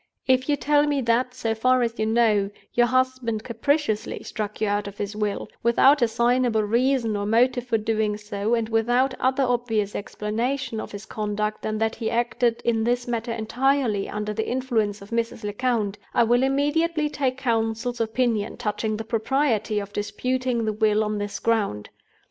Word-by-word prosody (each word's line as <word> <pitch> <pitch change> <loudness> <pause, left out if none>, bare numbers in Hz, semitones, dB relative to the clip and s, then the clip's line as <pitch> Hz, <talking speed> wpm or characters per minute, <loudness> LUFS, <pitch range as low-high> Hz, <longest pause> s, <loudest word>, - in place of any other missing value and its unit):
"If 260 +1 +2
you 290 - +4
tell 295 +1 +2
me 290 -1 +1
that, 250 +1 +1
so 225 -3 -1
far 255 +3 +3
as 230 0 -3
you 220 - +1
know, 220 -3 +3 0.2
your 240 0 +4
husband 255 -3 0
capriciously 235 -1 -1
struck 210 -1 -5
you 215 - +1
out 205 0 0
of 200 0 -9
his 205 +1 -4
will, 210 -1 -2
without 265 +5 +5
assignable 235 -1 +2
reason 235 +1 +1
or 205 0 -2
motive 245 +2 +2
for 230 - +2
doing 215 -1 0
so, 210 +2 -1
and 230 -1 -1
without 240 +4 +2
other 265 +1 +2
obvious 235 -5 0
explanation 230 +4 -3
of - - -6
his 205 +1 -8
conduct 210 0 -3
than 215 0 -2
that 225 +1 0
he 225 - -3
acted 235 0 0
in 225 -2 +2
this 245 +1 0
matter 235 0 -2
entirely 230 -1 0
under 210 0 -3
the 220 +1 -2
influence 225 -6 -1
of 200 - -15
Mrs. 230 -1 -2
Lecount, 210 -1 -1 0.2
I - - +5
will 240 +2 +3
immediately 300 +4 +1
take 270 -3 -1
Counsel's 230 -1 -1
opinion 225 -2 0
touching 215 -1 -2
the 220 - -4
propriety 225 -1 0
of 205 0 -4
disputing 250 +3 -1
the 215 - 0
will 215 0 +2
on 210 -1 -2
this 205 0 -4
ground. 205 - -1
230 Hz, 175 wpm, -24 LUFS, 215-255 Hz, 0.2 s, without